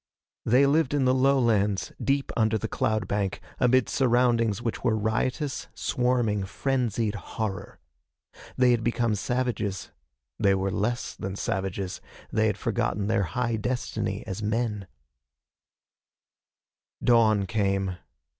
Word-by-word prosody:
They 125 +5 +5
lived 145 0 +2
in 140 -2 +2
the 130 - +4
lowlands, 120 -7 +2
deep 140 0 0
under 110 -1 +2
the 110 - -3
cloud 110 0 -1
bank, 100 -1 -1 0.2
amid 125 -1 +4
surroundings 120 -4 +2
which 120 -1 -4
were 115 -3 +2
riotous, 125 +6 -1
swarming, 120 -6 0
frenzied 115 0 -1
horror. 105 -1 -5 0.8
They 125 -1 +5
had 120 -2 +1
become 120 -1 +1
savages. 110 -3 -2 0.5
They 100 -1 +4
were 95 0 -1
less 120 +5 -1
than 95 0 -5
savages. 95 -1 -3 0.3
They - - +2
had - - -1
forgotten 100 -1 -1
their 110 0 +1 0.2
high 120 -2 +1
destiny 110 -3 -3
as 95 0 -5
men. 105 -2 -1 2.2
Dawn 110 -4 +4
came. 95 -2 0
110 Hz, 120 wpm, -26 LUFS, 100-125 Hz, 2.2 s, They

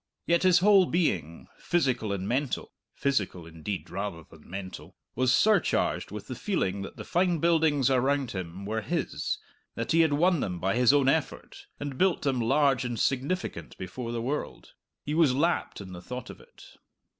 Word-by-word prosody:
Yet 170 0 +3
his 185 -2 +5
whole 195 -3 +6
being, 90 - -1
physical 130 -10 0
and 95 -1 -3
mental 130 +2 -1 0.2
(physical, 105 -11 -1
indeed, 85 +4 -5
rather 95 -3 -4
than 80 -1 -18
mental), 95 0 -8 0.2
was 130 0 +2
surcharged 210 - +2
with - - -7
the - - -6
feeling 100 - -1
that 100 - -8
the - - -6
fine 180 -1 +1
buildings 155 -5 +3
around 135 0 +1
him 95 0 -6
were 110 +2 -2
his, - - -2 0.4
that 115 0 -3
he 165 - +4
had 160 -3 +3
won 170 +3 +3
them 90 -8 -2
by 95 +2 0
his 125 0 +5
own 140 -2 +3
effort, 150 +2 -2
and 145 -2 -5
built 190 -1 +2
them 135 -4 +1
large 135 +2 +3
and 120 -3 -3
significant 140 +8 -2
before 115 +6 -6
the 115 -1 -3
world. 145 +5 -4 0.3
He 150 - -3
was 155 -5 +4
lapped 170 +5 0
in 95 -2 -9
the 90 - -8
thought 125 +6 -7
of - - -13
it. - - -18
130 Hz, 180 wpm, -28 LUFS, 100-160 Hz, 0.4 s, whole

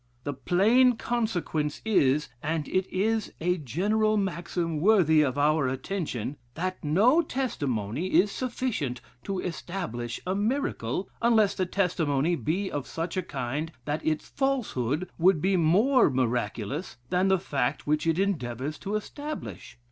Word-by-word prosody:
The 145 - -2
plain 215 - +4
consequence 180 -12 -1
is 150 -9 +3
(and 155 0 -2
it 185 0 0
is 215 +4 0
a 180 +2 0
general 210 - +1
maxim 175 -4 -2
worthy 175 -6 +5
of 140 -2 0
our 150 -1 +3
attention,) 135 - -3 0.2
'That 185 +2 -3
no 215 - +4
testimony 145 - -2
is 195 +2 +3
sufficient 235 - -2 0.3
to 195 - -2
establish 165 -10 -4
a 185 - 0
miracle, 200 - -1
unless 225 -3 +4
the 185 - -1
testimony 170 -5 +1
be 175 - -2
of 145 -2 -3
such 165 +2 -4
a 185 - +1
kind 145 +1 -4
that 150 +1 -2
its 155 -1 -1
falsehood 185 - -1
would 180 -1 +5
be 190 +5 +2
more 205 - +4
miraculous 125 - -2
than 185 +1 +3
the 190 0 +4
fact 140 -5 -2
which 150 +2 +1
it 165 0 +2
endeavors 150 - -2
to 205 +1 -3
establish. 250 - -6
175 Hz, 140 wpm, -27 LUFS, 145-200 Hz, 0.3 s, worthy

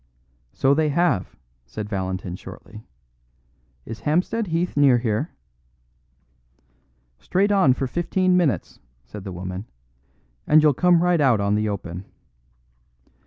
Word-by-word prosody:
"So 135 - +2
they 155 +1 +1
have," 150 - 0 0.3
said 105 - -6
Valentin 95 -3 -4
shortly. 110 +3 -12 1.0
"Is 115 0 -7
Hampstead 185 +8 0
Heath 170 +2 -1
near 140 -4 +5
here?" 115 +5 -1 1.9
"Straight 190 - +1
on 190 -10 +4
for 135 - -2
fifteen 180 +6 0
minutes," 175 -7 0 0.2
said 105 -2 -10
the 95 - -5
woman, 90 +3 -6 0.8
"and 155 0 +5
you'll 150 -2 +5
come 175 +3 +3
right 175 -3 +2
out 130 -6 +4
on 100 0 0
the 105 +1 0
open." 95 -2 -6
135 Hz, 120 wpm, -23 LUFS, -, 1.9 s, near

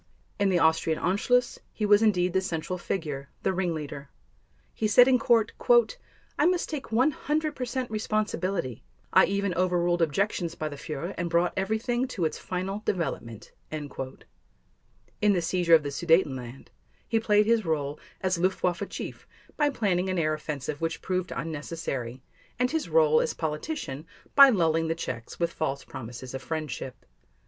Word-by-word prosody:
In 200 -1 +3
the 185 - +3
Austrian 160 -1 +2
Anschluss, 240 +7 +1
he 215 - -2
was 205 0 +5
indeed 180 -5 +2
the 190 - +2
central 180 0 -3
figure, 150 -7 -4
the - - +1
ringleader. 155 -6 -3 0.6
He 220 - 0
said 245 +4 +7
in 255 -1 +4
Court: 230 -2 +3 0.9
"I 295 - +5
must 360 -1 +1
take 290 -6 -5
100 300 +5 +1
percent 250 -1 -3
responsibility.... 205 - -2 0.3
I - - +7
even 200 -1 -1
overruled 175 0 +1
objections 170 +1 0
by 155 - -3
the 145 - -7
Führer 155 +3 -5
and 170 -1 -1
brought 170 +1 +2
everything 225 +6 0
to 190 -9 -2
its 155 - -2
final 190 +3 -3
development." 125 - -3 0.2
In 145 +7 -5
the 180 - +2
seizure 170 0 +4
of 155 - +3
the 145 - -3
Sudetenland, 140 -6 0 0.4
he 225 - +2
played 210 -1 +3
his 230 0 +3
role 150 -3 -2 0.2
as 185 -2 0
Luftwaffe 185 +1 0
chief - - -7 0.3
by 295 -1 +2
planning 190 -8 0
an 185 - -1
air 155 -2 +1
offensive 150 -1 -4
which 165 0 -2
proved 185 -1 -2
unnecessary, 145 -6 -4 0.3
and 250 0 +1
his 320 -1 -2
role 475 -1 +5
as - - -2
politician 155 - -4 0.3
by 275 -1 +10
lulling 165 -7 +2
the 165 - 0
Czechs 120 -8 -6
with 170 -1 0
false 140 -3 -2
promises 125 +1 -8
of 135 - -5
friendship. 135 -3 -5
175 Hz, 155 wpm, -27 LUFS, 155-215 Hz, 0.9 s, by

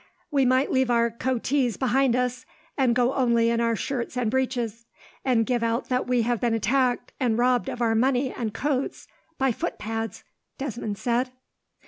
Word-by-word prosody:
"We 275 -2 +3
might 255 +2 +2
leave 260 -1 +2
our 235 -1 +3
coatees 255 +1 0
behind 260 -1 +2
us, 250 0 -1 0.3
and 255 -4 +2
go 250 +1 +2
only 235 -3 +3
in 235 0 +1
our 230 -1 +2
shirts 250 +1 -3
and 235 -3 0
breeches; 240 -3 -2 0.4
and 240 -4 +2
give 245 -1 0
out 230 +2 -1
that 250 0 0
we 250 -2 +2
had 240 0 0
been 235 -2 +1
attacked, 245 +3 +1
and 240 -4 +1
robbed 245 0 +2
of 240 - -3
our 225 -1 +2
money 255 +3 +2
and 225 -3 -3
coats 275 +4 -2 0.3
by 265 -1 +2
footpads," 225 0 -4 0.3
Desmond 235 -6 -4
said. 245 +3 0
245 Hz, 170 wpm, -25 LUFS, 230-260 Hz, 0.4 s, We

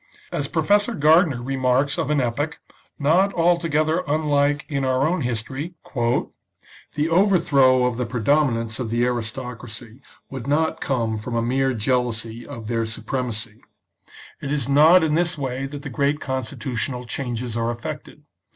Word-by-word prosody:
As - - -1
Professor 205 +3 +2
Gardiner 155 -1 +4
^ - - -8
remarks 135 +3 +1
of 160 -3 -1
an 150 -1 +2
epoch, 135 +5 -2 0.4
not 170 +7 +3
altogether 165 -1 +2
unlike 145 -1 +1
in 140 -3 -2
our 130 +2 +2
own 175 0 0
history, 130 +7 -4
" - - -21 1.0
the 150 +1 +1
overthrow 150 -9 +4
of 125 -2 -1
the 125 -2 -2
predomin 125 +2 +2
ance 115 0 -5
of 120 -3 -3
the 120 +2 +1
aristocracy 120 0 -5 0.3
would 135 -2 -7
not 155 +3 +1
come 115 -5 -1
from 115 +3 -5
a 115 - +1
mere 130 +2 +1
jealousy 115 0 -1
of 115 -6 -8
their 115 -1 -1
supremacy. 115 -1 -5 0.8
It 140 - -4
is 145 -2 0
not 155 +5 +6
in 155 -1 +1
this 170 +1 +1
way 135 -1 -3
that 145 +1 -7
great 140 +4 0
constitutional 130 -1 -3
changes 120 -1 -4
are 115 0 0
effected. 120 0 -7
135 Hz, 150 wpm, -23 LUFS, 120-150 Hz, 1.0 s, not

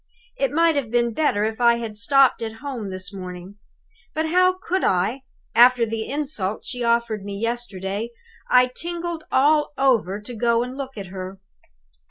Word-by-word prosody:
It 275 -2 0
might 330 +1 +3
have 260 -6 -1
been 235 0 +1
better 235 -7 +1
if 220 +2 -2
I 235 -1 +6
had 230 -2 -5
stopped 270 +5 +4
at 225 -1 -4
home 250 -8 -4
this 185 +1 -5
morning. 185 +1 -8 0.6
But 315 +1 0
how 365 +2 +3
could 375 0 -2
I? 195 +9 +1 0.3
After 245 0 +6
the 220 0 -4
insult 270 -9 -2
she 245 -2 -4
offered 235 -3 +1
me 200 0 -5
yesterday, 220 -2 -3 0.4
I 250 0 +6
tingled 345 -1 -4
all 295 +2 +3
over 230 -8 +2
to 210 +4 -9
go 235 +1 +2
and 250 +1 -6
look 270 -3 -6
at 195 -3 -6
her. 190 0 -7
235 Hz, 170 wpm, -23 LUFS, 205-275 Hz, 0.6 s, I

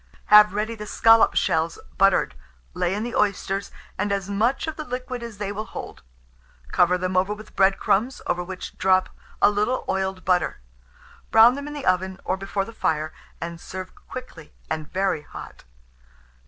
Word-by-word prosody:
Have 210 -1 +8
ready 215 +2 -1
the 210 -1 -8
scallop 225 +1 +5
shells 160 +1 +1 0.2
buttered; 195 0 +4 0.4
lay 180 +2 0
in 210 - -2
the 240 0 -4
oysters, 200 -1 0 0.3
and 205 +1 0
as 200 0 -2
much 225 +7 +1
of 315 -1 -4
the 305 - -5
liquid 250 -2 -5
as 235 -3 -8
they 205 -1 -3
will 215 +2 -4
hold; - - -8 0.7
cover 180 +1 +4
them 185 0 -2
over 190 +3 +2
with 215 0 -14
bread 195 0 +4
crumbs, 235 +7 +1
over 180 0 -1
which 185 +1 -8
drop 185 0 +3 0.3
a - - +7
little 210 +5 0
oiled 190 -1 -2
butter. 180 -1 +1 0.7
Brown 225 +2 +7
them 280 +2 -6
in 295 - -6
the 290 - -6
oven, 185 +1 +1
or 185 - +1
before 195 0 -3
the 230 - -10
fire, 155 -7 -1 0.3
and 170 0 -6
serve 185 0 -7
quickly, 250 -12 -9 0.2
and 155 -1 -3
very 190 -4 0
hot. - - -11
195 Hz, 175 wpm, -24 LUFS, 185-220 Hz, 0.7 s, Have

